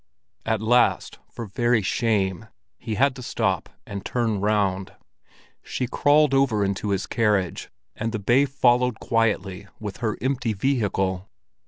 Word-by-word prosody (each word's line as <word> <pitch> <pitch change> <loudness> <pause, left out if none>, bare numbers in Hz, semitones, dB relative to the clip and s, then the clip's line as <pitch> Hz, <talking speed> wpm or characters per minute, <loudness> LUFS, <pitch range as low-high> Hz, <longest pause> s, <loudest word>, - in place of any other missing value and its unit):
At 110 -1 0
last, 120 +2 +2
for 115 - -7
very 120 +1 +1
shame, 100 -1 0 0.3
he 110 -3 -4
had 135 +3 +2
to - - -7
stop - - -1 0.2
and 100 -1 -6
turn 115 -4 -1
round. 100 -2 0 0.7
She 130 - -3
crawled 145 +3 +3
over 125 -7 +2
into 100 +1 -2
his 100 -1 0
carriage, 105 -6 0 0.3
and 115 +1 -3
the 110 - -2
bay 120 +7 +3
followed 125 -3 +2
quietly 105 -4 -1
with 105 -3 -6
her 110 -3 -2
empty 130 -3 -1
vehicle. 100 -5 -1
110 Hz, 140 wpm, -24 LUFS, 100-125 Hz, 0.7 s, crawled